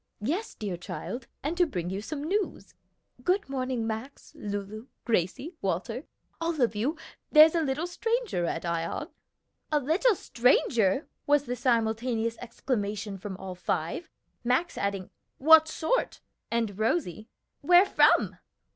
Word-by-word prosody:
"Yes, 335 - -2
dear 200 -5 -4
child, 235 +7 -6 0.2
and 300 +5 -1
to 355 -1 +4
bring 180 - -3
you 195 +1 -3
some 285 +6 -5
news. 390 +6 -2 0.5
Good 370 0 +1
morning, 255 -3 -2
Max, 225 +5 -6
Lulu, 205 +3 -5 0.2
Gracie, 230 - 0
Walter 195 - -2 0.4
all 330 -2 -1
of 240 -4 +2
you 265 +10 -1 0.3
there's 310 0 +8
a 335 - +2
little 295 +2 -1
stranger 455 - -1
at 165 - -3
Ion." 170 -1 -2 0.6
"A 300 - +3
little 345 - +3
stranger!" 235 - +2 0.2
was 290 -1 +4
the 245 -2 -3
simultaneous 230 -1 0
exclamation 210 -4 -3
from 190 0 -6
all 190 -1 -6
five, 175 - -3 0.3
Max 255 +8 +1
adding, 200 -2 -2 0.3
"What 315 +2 +7
sort?" 320 +10 -1 0.3
and 225 -4 -1
Rosie, 220 - -1 0.3
"Where 355 +5 +7
from?" - - +4
245 Hz, 135 wpm, -28 LUFS, 205-315 Hz, 0.6 s, there's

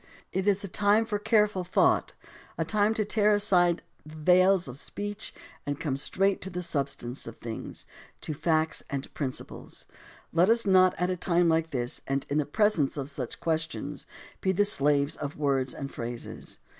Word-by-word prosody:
It 190 +1 -1
is 200 0 +2
a - - -3
time 205 +3 +3
for 210 -2 -2
careful 210 -3 +2
thought, 175 - +2 0.4
a - - 0
time 215 +1 +2
to 215 - 0
tear 210 0 +3
aside 180 -4 +3 0.2
the 155 +1 -12
veils 180 +2 +4
of 125 +2 -8
speech 205 +1 -6 0.3
and 145 0 -3
come 150 -5 -1
straight 195 +8 +1
to 190 - -4
the 180 -1 -4
substance 140 -6 -3
of 115 - -8
things, 115 -1 -7 0.4
to 155 - -4
facts 160 +1 +1
and 140 -1 -4
prin 140 -3 -1
ciples. 130 - -7 0.5
Let 175 +4 +4
us 230 0 +4
not 185 -1 +5
at 180 +1 +1
a - - 0
time 175 -1 +2
like 165 0 +2
this 125 -4 -1
and 135 0 -1
in 150 - +2
the 150 - -1
pres 210 +4 +2
ence 140 0 0
of 140 +1 -4
such 130 -4 -5
questions, 160 -3 -3 0.3
be 190 - +2
the 205 +2 +3
slaves 145 -5 +2
of 145 -1 -5
words 135 -3 +1
and 140 -1 -6
phrases. 120 0 -6
170 Hz, 185 wpm, -28 LUFS, 140-200 Hz, 0.5 s, not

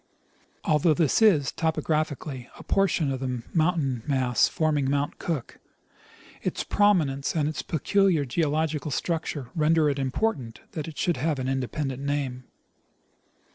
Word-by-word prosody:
Although 155 +1 +3
this 160 - +2
is, 160 -11 +5
topographically, 155 -4 -2
a - - -11
portion 185 -7 +1
of 130 - -2
the 125 -3 -3
mountain 155 -7 +1
mass 130 -4 +3
forming 150 -4 0
Mount 145 +1 -1
Cook, 155 -8 -4 0.8
its - - -2
prominence 165 -11 +2
and 150 -2 +1
its 150 -4 -3
peculiar 170 +2 +2
geological 155 +2 0
structure 150 -3 -3
render 155 -2 +3
it 140 - -3
important 135 - -1
that 155 0 -5
it 160 - -9
should 175 -5 +1
have 150 +3 0
an 130 -1 -3
independent 135 +1 -2
name. 140 -3 -2
150 Hz, 135 wpm, -26 LUFS, 135-160 Hz, 0.8 s, is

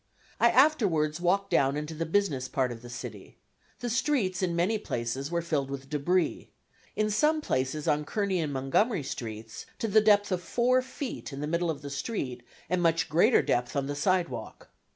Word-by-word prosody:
I 235 - +6
afterwards 190 - +3
walked 195 +3 +1
down 140 +1 +3
into 150 +2 -4
the 165 +1 -3
business 160 -8 +1
part 130 -1 0
of 115 -1 -8
the 120 - -10
city. 120 -4 -8 0.4
The 245 - -2
streets 225 -7 0
in 175 -2 0
many 190 +6 +1
places 125 - -3
were 170 0 -1
filled 145 -5 -1
with 135 0 -7
debris 170 +5 0 0.5
in 215 0 +1
some 300 +9 +3
places 135 - -2
on 150 0 +2
Kearny 195 +2 -1
and 155 -3 -1
Montgomery 140 - +1
streets 110 -4 -7
to 225 - -2
the 215 +1 +5
depth 205 -1 +4
of 180 -1 0
four 250 +6 +2
feet 260 - -6
in 135 - -6
the 150 - -2
middle 170 +2 0
of 145 -3 -4
the 140 - -6
street 140 - -3 0.3
and 180 +2 0
much 165 -1 +2
greater 175 - +4
depth 125 +3 0
on 140 -1 0
the 145 +1 -3
sidewalk. 165 - -1
165 Hz, 190 wpm, -28 LUFS, 135-205 Hz, 0.5 s, I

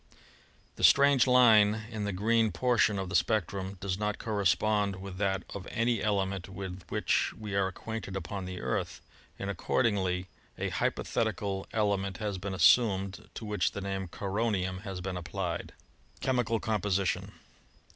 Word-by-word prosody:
The - - -5
strange 140 -2 +6
line 110 -4 +6
in 105 -2 -3
the 100 - -1
green 110 +3 +2
por 120 +9 +1
tion 105 -2 +4
of 95 -1 -3
the 100 - -3
spectrum 95 0 0
does 95 0 -2
not 105 0 -1
correspond 105 -1 +1
with 95 0 -8
that 95 -2 0
of 100 -1 -7
any 115 -1 0
element 95 -2 -1
with 95 -1 -6
which - - +1
we 105 -2 -6
are 100 -1 +2
acquainted 100 0 -6
upon 95 +1 -4
the 90 0 -6
Earth, - - -2 0.4
and 100 - -5
accordingly 95 -1 0 0.3
a - - -2
hypothetical 95 -1 -1
element 100 -3 0
has 105 -3 -3
been 95 0 -4
assumed, 95 0 +3
to 110 - -6
which 105 -1 0
the 100 - -5
name 95 0 -3
of - - -11
"coronium" 95 -2 -1
has 95 -3 -6
been 95 0 -4
applied. 90 -1 -4 0.5
Chemical 125 -4 +1
Composition. 100 -4 -1
100 Hz, 155 wpm, -30 LUFS, 95-110 Hz, 0.5 s, strange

